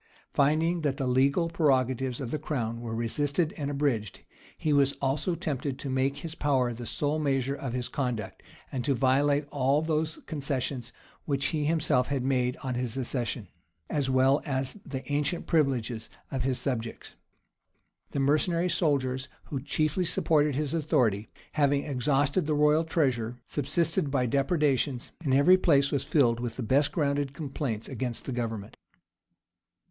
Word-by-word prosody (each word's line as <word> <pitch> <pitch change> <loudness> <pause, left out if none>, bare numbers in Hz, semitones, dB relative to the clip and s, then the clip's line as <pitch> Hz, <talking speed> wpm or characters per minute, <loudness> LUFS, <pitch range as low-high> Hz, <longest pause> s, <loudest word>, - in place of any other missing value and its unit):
Finding 160 +4 +2
that 140 -3 0
the 135 - -1
legal 135 +6 +3
prerogatives 130 -6 +1
of 125 -4 -4
the 155 - -1
crown 115 -5 -3
were 115 -1 -4
resisted 145 +7 0
and 145 -3 -3
abridged, 135 - -1 0.4
he 155 - 0
was 140 -1 +4
also 140 +6 -1
tempted 140 -4 -3
to 140 -1 -5
make 135 +2 +1
his 160 +2 -6
power 130 -6 +1
the 120 0 -7
sole 150 +5 0
measure 135 -2 0
of 135 -3 -5
his 125 -1 -2
conduct, 125 -6 -3 0.3
and 130 -2 -2
to 140 0 +1
violate 140 +3 +2
all 140 +1 +2
those 160 0 -1
concessions 135 -4 -3 0.3
which 140 -2 0
he 150 -2 0
himself 150 -5 +2
had 140 -3 -1
made 125 -2 +1
on 130 -1 -2
his 125 0 -3
accession,[*] 120 -4 -2 0.4
as 140 -3 0
well 130 +2 +4
as 135 +4 -1
the 130 -2 -5
ancient 150 +4 0
privileges 125 -7 0 0.2
of 135 - -2
his 130 0 0
subjects. 115 -4 -3 1.0
The - - -3
mercenary 165 +5 +2
soldiers, 140 -6 0 0.2
who 135 -3 -3
chiefly 155 +5 0
supported 150 -3 +2
his 150 0 -1
authority, 120 -10 +1 0.2
having 145 -2 +2
exhausted 145 +4 +1
the 155 - +1
royal 150 +2 +4
treasure, 125 -8 0
subsisted 155 +3 0
by 135 -2 +1
depredations; 140 -1 +1
and 140 - 0
every 165 +7 +6
place 140 -6 +4
was 140 -3 0
filled 120 -6 +3
with 120 -2 -4
the 130 - -4
best 140 +6 +2
grounded 140 -3 0
complaints 135 -7 -3
against 125 -2 -3
the - - -4
government. 115 -4 -4
140 Hz, 155 wpm, -28 LUFS, 125-150 Hz, 1.0 s, every